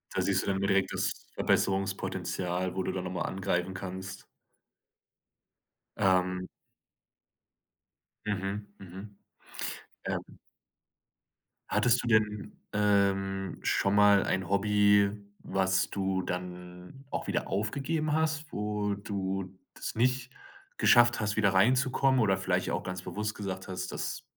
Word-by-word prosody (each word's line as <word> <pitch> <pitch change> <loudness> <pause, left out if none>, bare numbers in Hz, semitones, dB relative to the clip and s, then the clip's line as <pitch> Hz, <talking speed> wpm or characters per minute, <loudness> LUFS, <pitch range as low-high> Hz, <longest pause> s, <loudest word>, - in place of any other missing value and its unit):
Da - - +2
siehst 95 -1 +1
du - - -6
dann 95 -1 +1
wieder 100 - 0
direkt 95 0 +2
das - - 0 0.2
Verbesserungspotenzial, 95 -2 0
wo 95 - -1
du - - -1
dann 95 - -3
nochmal 90 -1 -3
angreifen 95 -1 -1
kannst. 95 +1 -7 1.7
Ähm 90 -1 +2 1.8
Mhm, 100 0 -2
mhm. 95 +2 -10 0.9
Ähm. - - -2 1.5
Hattest 125 0 +3
du 120 - -4
denn, 105 -2 +1
ähm, 95 -2 +1
schon 100 0 +1
mal 105 -1 +6
ein 95 -1 -1
Hobby, 100 0 +4 0.3
was 95 -1 +1
du 95 -1 -1
dann 90 +6 -7
auch - - -4
wieder - - -1
aufgegeben 145 +10 -1
hast, 155 0 +1
wo 105 -1 -1
du 95 -2 -3 0.2
das - - -5
nicht 125 +2 +1 0.5
geschafft 120 0 +6
hast, 105 -1 -1
wieder 100 -3 +3
reinzukommen 130 +5 +3
oder 95 -3 +3
vielleicht - - 0
auch - - -1
ganz 90 -1 -5
bewusst 105 +3 -3
gesagt 95 -2 -5
hast: 95 0 -4
„Das - - -4
100 Hz, 120 wpm, -30 LUFS, 95-105 Hz, 1.8 s, mal